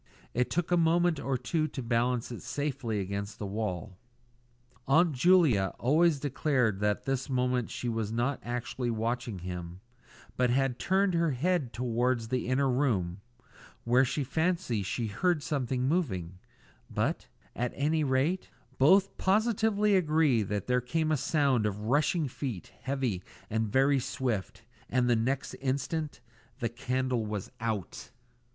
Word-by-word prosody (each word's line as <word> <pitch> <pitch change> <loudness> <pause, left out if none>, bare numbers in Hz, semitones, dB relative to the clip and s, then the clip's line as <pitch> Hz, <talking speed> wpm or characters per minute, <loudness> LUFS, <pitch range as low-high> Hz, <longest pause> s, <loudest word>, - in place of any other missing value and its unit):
It 125 +1 +1
took 175 +5 -1
a 175 - +4
moment 170 -1 +3
or 135 -2 -1
two 155 +6 -1
to 135 -4 -6
balance 120 +1 0
it 120 - -6
safely 130 -3 -2
against 100 +2 -4
the 105 - -5
wall. 95 -2 -4 0.9
Aunt 165 +5 +4
Julia 140 - +4
always 155 +4 +3
declared 130 -7 +1
that 105 0 +1
at - - -28
this 135 +1 -1
moment 125 -2 0
she 125 - -4
was 110 -2 -1
not 120 +4 0
actually 120 +1 -3
watching 115 -1 -2
him, 90 -1 -6 0.6
but 125 -1 +3
had 130 0 +1
turned 190 0 +2
her 170 -1 +2
head 150 -1 0
towards 120 -1 0
the 125 -1 -1
inner 130 +2 +2
room, 105 -9 0 0.6
where 125 +2 +4
she 140 +2 -1
fancied 160 - 0
she 115 +4 -2
heard 150 - 0
something 130 -5 -1
moving; 95 - -1 0.5
but, - - -1 0.3
at 120 +1 -1
any 155 +2 +1
rate, 140 +7 0 0.3
both 190 +8 +5
positively 210 0 +2
agreed 155 - +3
that 105 -1 -2
there 125 0 +2
came 155 +6 0
a - - +4
sound 135 -6 +2
of 105 0 -4
rushing 145 +7 +1
feet, 125 -7 -6
heavy 130 -8 -1 0.3
and 110 -1 0
very 135 +2 +4
swift 120 -5 -3 0.3
and 125 +1 +2
the 120 - +4
next 130 +5 -1
instant 140 +3 -2 0.4
the 115 - -1
candle 125 0 -1
was 105 -2 -4
out! 110 -5 -4
125 Hz, 145 wpm, -30 LUFS, 115-150 Hz, 0.9 s, both